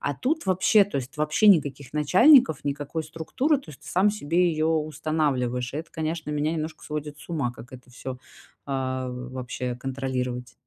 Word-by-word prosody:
А 145 Hz, -, -1 dB
тут 305 Hz, -, -1 dB
вообще, 190 Hz, +3 st, +5 dB
то 200 Hz, -7 st, -3 dB
есть, 135 Hz, +3 st, -5 dB
вообще 150 Hz, +8 st, +2 dB
никаких 145 Hz, -8 st, +3 dB
начальников, 180 Hz, -, +5 dB
никакой 145 Hz, +3 st, -3 dB
структуры, 165 Hz, -, 0 dB
то 270 Hz, -, -13 dB
есть 140 Hz, -, -14 dB
ты -, -, -15 dB
сам 190 Hz, +3 st, +3 dB
себе 175 Hz, -2 st, +1 dB
её 155 Hz, -1 st, 0 dB
устанавливаешь. 150 Hz, -6 st, -1 dB
Это, 160 Hz, +2 st, -6 dB
конечно, 160 Hz, -1 st, -3 dB
меня 150 Hz, +1 st, 0 dB
немножко 155 Hz, -1 st, -4 dB
сводит 150 Hz, -1 st, -5 dB
с -, -, -14 dB
ума, 140 Hz, -8 st, -1 dB
как 120 Hz, +1 st, -13 dB
это 125 Hz, -1 st, -13 dB
всё, 130 Hz, +1 st, -7 dB, 0.5 s
а, 130 Hz, -2 st, -2 dB
вообще 125 Hz, 0 st, -5 dB
контролировать. 125 Hz, -2 st, -3 dB
150 Hz, 170 wpm, -25 LUFS, 130-165 Hz, 0.5 s, вообще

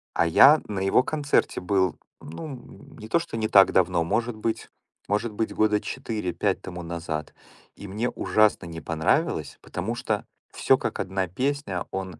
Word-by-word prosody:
А -, -, +3 dB
я 140 Hz, -, +7 dB
на 105 Hz, -2 st, -3 dB
его 95 Hz, +6 st, +3 dB
концерте 145 Hz, -7 st, 0 dB
был, 95 Hz, -1 st, +1 dB, 0.2 s
ну, 80 Hz, -, -8 dB
м, 135 Hz, -5 st, -11 dB
не 110 Hz, -, -9 dB
то 170 Hz, -, +2 dB
что 165 Hz, -9 st, -6 dB
не 110 Hz, -1 st, 0 dB
так 100 Hz, -3 st, +6 dB
давно, 90 Hz, -2 st, +2 dB
может 115 Hz, +7 st, -1 dB
быть 110 Hz, +1 st, -3 dB, 0.4 s
может 105 Hz, +2 st, 0 dB
быть, 110 Hz, +1 st, -2 dB
года 105 Hz, -1 st, +2 dB
4, 105 Hz, -5 st, -4 dB
5 -, -, 0 dB
тому 90 Hz, -1 st, -7 dB
назад, 80 Hz, -2 st, -5 dB, 0.4 s
и 100 Hz, -, -9 dB
мне 110 Hz, +6 st, -2 dB
ужасно 110 Hz, -3 st, +2 dB
не 80 Hz, -1 st, -7 dB
понравилось, 80 Hz, 0 st, 0 dB
потому 110 Hz, +7 st, -4 dB
что 105 Hz, -3 st, -2 dB, 0.3 s
всё -, -, +3 dB
как -, -, -4 dB
одна 95 Hz, 0 st, -1 dB
песня, 125 Hz, -, -2 dB
он 95 Hz, -3 st, -5 dB
105 Hz, 170 wpm, -25 LUFS, 90-115 Hz, 0.4 s, я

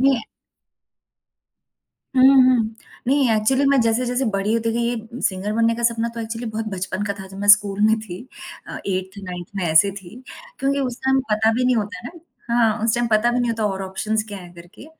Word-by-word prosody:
ये 270 Hz, +1 st, +4 dB
है 225 Hz, -, -6 dB, 1.9 s
हुँ, 255 Hz, -, +6 dB, 0.2 s
हुँ। 230 Hz, -4 st, +2 dB, 0.3 s
नहीं 270 Hz, -1 st, +3 dB
एक्चुअली 260 Hz, +6 st, +2 dB
मैं 275 Hz, -2 st, +4 dB
जैसे-जैसे 245 Hz, +3 st, 0 dB
बड़ी 195 Hz, +2 st, 0 dB
होती 230 Hz, 0 st, 0 dB
गई, 235 Hz, -, -1 dB
ये 235 Hz, +1 st, -6 dB
सिंगर 195 Hz, +2 st, -1 dB
बनने 230 Hz, +1 st, +2 dB
का 235 Hz, -, -6 dB
सपना 230 Hz, 0 st, +1 dB
तो 230 Hz, -, -5 dB
एक्चुअली 230 Hz, +1 st, -5 dB
बहुत 220 Hz, +1 st, -4 dB
बचपन 185 Hz, +1 st, -4 dB
का 200 Hz, -, -1 dB
था 190 Hz, -, -8 dB
जब 195 Hz, -, -11 dB
मैं 205 Hz, +1 st, -3 dB
स्कूल 205 Hz, -1 st, +5 dB
में 220 Hz, 0 st, +3 dB
थी। 185 Hz, -5 st, -8 dB, 0.5 s
अ, -, -, -7 dB
8th-9th 185 Hz, -2 st, -5 dB
में 190 Hz, -, -1 dB
ऐसे 160 Hz, +4 st, +4 dB
थी 180 Hz, +1 st, -13 dB, 0.4 s
क्योंकि 275 Hz, +1 st, 0 dB
उस 250 Hz, -3 st, -3 dB
टाइम 265 Hz, 0 st, +3 dB
पता 220 Hz, +1 st, +3 dB
भी 250 Hz, +3 st, 0 dB
नहीं 250 Hz, -1 st, +3 dB
होता 205 Hz, -3 st, -3 dB
है -, -, -13 dB
ना, 340 Hz, -, -14 dB, 0.3 s
हाँ, 225 Hz, -2 st, +2 dB
उस 225 Hz, 0 st, +2 dB
टाइम 240 Hz, 0 st, 0 dB
पता 220 Hz, +2 st, +3 dB
भी 245 Hz, -, 0 dB
नहीं 240 Hz, -, 0 dB
होता 225 Hz, -1 st, -2 dB
और 195 Hz, -1 st, -3 dB
ऑप्शन्स 210 Hz, +3 st, -2 dB
क्या 205 Hz, -1 st, -7 dB
हैं 175 Hz, -2 st, -12 dB
करके, 175 Hz, -, -14 dB
220 Hz, 210 wpm, -21 LUFS, 195-240 Hz, 1.9 s, हुँ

